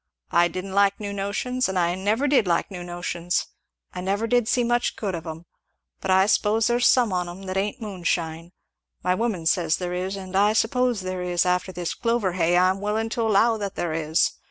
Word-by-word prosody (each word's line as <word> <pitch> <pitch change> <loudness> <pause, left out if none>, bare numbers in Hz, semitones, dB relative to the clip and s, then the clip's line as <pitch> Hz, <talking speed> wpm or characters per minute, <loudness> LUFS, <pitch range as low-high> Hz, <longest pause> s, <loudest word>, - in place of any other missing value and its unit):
I 175 0 +4
didn't 185 +3 -6
like 200 0 +3
new 205 -1 -4
notions 200 +5 -1
and 190 - -2
I 175 -1 +2
never 210 +9 0
did 260 -8 +3
like 170 +3 0
new 180 -2 -6
notions! 175 0 -2 0.5
and 180 +1 -4
I - - +3
never 210 +3 0 0.2
see 245 +1 +2
much 240 0 0
good 200 -3 -3
of 165 -1 -6
'em; 160 +2 -7 0.5
but - - -5
I 190 +1 +5
suppose 215 +1 +2
there's 240 +1 +3
some 240 -6 +3
on 180 -1 -1
'em 180 +3 -9
that 185 -1 -5
ain't 205 +6 -1
moon 195 -4 -7
shine 165 0 -2 0.5
my 180 +1 +2
woman 205 -5 -2
says 165 -1 +2
there 180 -1 -4
is, 185 +2 -3
and 190 -1 -7
I 205 +2 +4
suppose 240 0 +1
there 185 0 -4
is, 180 -1 0
and 180 - +3
after 180 +1 -1
this 175 -2 -4
clover 230 -5 0
hay 175 0 +2
I'm 185 +2 +2
willin' 215 +2 -1
to 230 - -2
allow 225 +1 +3
that 200 -2 -5
there 170 -2 -2
is! 160 0 +1
190 Hz, 220 wpm, -24 LUFS, 175-215 Hz, 0.5 s, I